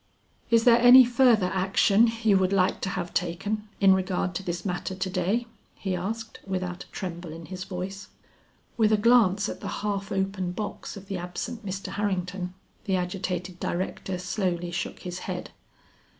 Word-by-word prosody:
"Is 230 Hz, -1 st, +4 dB
there 240 Hz, -1 st, +6 dB
any 245 Hz, +1 st, +9 dB
further 240 Hz, -6 st, +4 dB
action 195 Hz, +4 st, +4 dB
you 210 Hz, -3 st, +5 dB
would 190 Hz, 0 st, +1 dB
like 190 Hz, -1 st, +2 dB
to 190 Hz, -, -1 dB
have 180 Hz, -2 st, -4 dB
taken 200 Hz, +5 st, -2 dB
in 195 Hz, -1 st, +6 dB
regard 185 Hz, -1 st, 0 dB
to 170 Hz, -, -3 dB
this 175 Hz, -2 st, -4 dB
matter 185 Hz, 0 st, -3 dB
to 185 Hz, 0 st, -2 dB
day?" 195 Hz, +6 st, 0 dB, 0.3 s
he 190 Hz, -2 st, -2 dB
asked, 220 Hz, +5 st, -4 dB
without 185 Hz, -2 st, -4 dB
a -, -, -23 dB
tremble 175 Hz, -3 st, -6 dB
in 165 Hz, +1 st, -9 dB
his 185 Hz, +3 st, -6 dB
voice. 195 Hz, +1 st, -6 dB, 0.7 s
With 220 Hz, -2 st, +4 dB
a 215 Hz, -, +5 dB
glance 210 Hz, -3 st, +4 dB
at -, -, -5 dB
the -, -, -6 dB, 0.2 s
half 200 Hz, -1 st, -2 dB
open 190 Hz, -2 st, -1 dB
box 210 Hz, +1 st, -5 dB
of 200 Hz, -, -10 dB
the 190 Hz, -1 st, -4 dB
absent 215 Hz, +7 st, -5 dB
Mr. 195 Hz, -1 st, -5 dB
Harrington, 185 Hz, -2 st, -2 dB, 0.3 s
the 195 Hz, -3 st, +1 dB
agitated 180 Hz, 0 st, -3 dB
director 185 Hz, +1 st, -3 dB
slowly 180 Hz, -1 st, -2 dB
shook 175 Hz, -, -4 dB
his 180 Hz, 0 st, -5 dB
head. -, -, -4 dB
190 Hz, 170 wpm, -27 LUFS, 180-210 Hz, 0.7 s, any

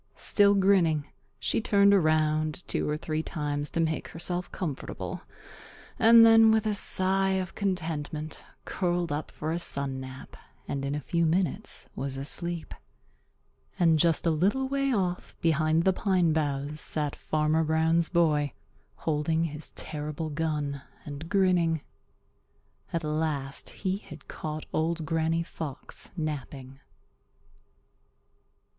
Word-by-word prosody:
Still 205 Hz, -1 st, +4 dB
grinning, 180 Hz, -7 st, +3 dB, 0.3 s
she -, -, 0 dB
turned 200 Hz, -2 st, +5 dB
around 155 Hz, -2 st, +2 dB
two -, -, -1 dB
or 150 Hz, -, 0 dB
three 155 Hz, 0 st, -2 dB
times 145 Hz, -3 st, -3 dB
to -, -, -3 dB
make 160 Hz, -1 st, 0 dB
herself 175 Hz, +2 st, -4 dB
comfortable 155 Hz, -8 st, -5 dB, 0.8 s
and 230 Hz, 0 st, +8 dB
then, 225 Hz, 0 st, +7 dB
with 220 Hz, 0 st, +3 dB
a 215 Hz, -, +1 dB
sigh 190 Hz, -1 st, +2 dB
of 185 Hz, -2 st, -2 dB
contentment, 160 Hz, -5 st, -3 dB, 0.2 s
curled 175 Hz, -2 st, -1 dB
up 150 Hz, +1 st, -3 dB
for 155 Hz, -, -4 dB
a 170 Hz, -, -1 dB
sun 140 Hz, -5 st, -2 dB
nap, 130 Hz, 0 st, -9 dB, 0.3 s
and 140 Hz, -1 st, -3 dB
in 140 Hz, +1 st, -1 dB
a -, -, -1 dB
few 170 Hz, +5 st, 0 dB
minutes 170 Hz, -1 st, -1 dB
was 135 Hz, 0 st, -3 dB
asleep. 170 Hz, +4 st, -3 dB, 1.0 s
And 165 Hz, -4 st, +4 dB
just 165 Hz, +1 st, +2 dB
a 165 Hz, -, +4 dB
little 200 Hz, +12 st, +1 dB
way 275 Hz, 0 st, 0 dB
off 185 Hz, -6 st, -1 dB
behind 160 Hz, 0 st, +2 dB
the 190 Hz, -, +4 dB
pine 180 Hz, -4 st, +2 dB
boughs 145 Hz, 0 st, -1 dB
sat 150 Hz, -2 st, 0 dB
Farmer 155 Hz, +1 st, +1 dB
Brown's 160 Hz, +1 st, +2 dB
boy 150 Hz, -5 st, +2 dB, 0.4 s
holding 160 Hz, +1 st, 0 dB
his 155 Hz, -1 st, -4 dB
terrible 150 Hz, +1 st, -5 dB
gun 150 Hz, -3 st, -2 dB, 0.2 s
and 145 Hz, +3 st, -7 dB
grinning. 180 Hz, -5 st, +2 dB, 1.1 s
At 170 Hz, -1 st, -2 dB
last 150 Hz, -3 st, -2 dB
he 190 Hz, -1 st, -2 dB
had -, -, -13 dB
caught 155 Hz, 0 st, -5 dB
Old 160 Hz, 0 st, 0 dB
Granny 165 Hz, +1 st, 0 dB
Fox 150 Hz, -4 st, -7 dB
napping. 140 Hz, -4 st, -5 dB
160 Hz, 130 wpm, -28 LUFS, 150-180 Hz, 1.1 s, and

